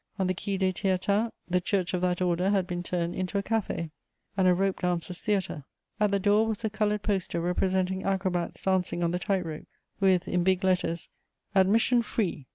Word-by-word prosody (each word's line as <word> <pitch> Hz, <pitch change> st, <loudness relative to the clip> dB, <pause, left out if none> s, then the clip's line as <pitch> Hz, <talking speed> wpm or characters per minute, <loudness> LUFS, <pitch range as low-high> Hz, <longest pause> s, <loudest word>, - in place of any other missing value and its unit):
On 190 Hz, -, +1 dB
the 185 Hz, -, +1 dB
Quai 195 Hz, +2 st, -3 dB
des 190 Hz, -1 st, +1 dB
Théatins, 200 Hz, +4 st, +1 dB, 0.2 s
the 180 Hz, 0 st, +1 dB
church 185 Hz, 0 st, 0 dB
of 180 Hz, -, 0 dB
that 180 Hz, 0 st, +1 dB
Order 180 Hz, +1 st, +1 dB
had 195 Hz, -3 st, +2 dB
been 175 Hz, -1 st, -3 dB
turned 175 Hz, -1 st, -2 dB
into 185 Hz, +2 st, -2 dB
a 200 Hz, -, 0 dB
café 200 Hz, -7 st, -2 dB, 0.4 s
and 190 Hz, -1 st, +3 dB
a 180 Hz, -, +6 dB
rope 195 Hz, +1 st, 0 dB
dancers' 180 Hz, 0 st, -1 dB
theatre. 195 Hz, -8 st, -1 dB, 0.4 s
At 210 Hz, -1 st, +3 dB
the 200 Hz, -, +2 dB
door 205 Hz, +3 st, +3 dB
was 220 Hz, +1 st, -3 dB
a 220 Hz, -, -1 dB
coloured 210 Hz, -1 st, 0 dB
poster 190 Hz, -4 st, -1 dB
representing 185 Hz, +2 st, 0 dB
acrobats 185 Hz, -3 st, -1 dB
dancing 185 Hz, -2 st, +1 dB
on 170 Hz, -, +1 dB
the 180 Hz, -, -1 dB
tight 190 Hz, -1 st, 0 dB
rope, 155 Hz, -2 st, -7 dB, 0.3 s
with, 190 Hz, -2 st, +3 dB
in 180 Hz, -1 st, +1 dB
big 190 Hz, +1 st, +2 dB
letters, 180 Hz, -3 st, 0 dB, 0.5 s
ADMISSION 220 Hz, +5 st, +4 dB
FREE. 180 Hz, -, -2 dB
185 Hz, 195 wpm, -28 LUFS, 180-200 Hz, 0.5 s, a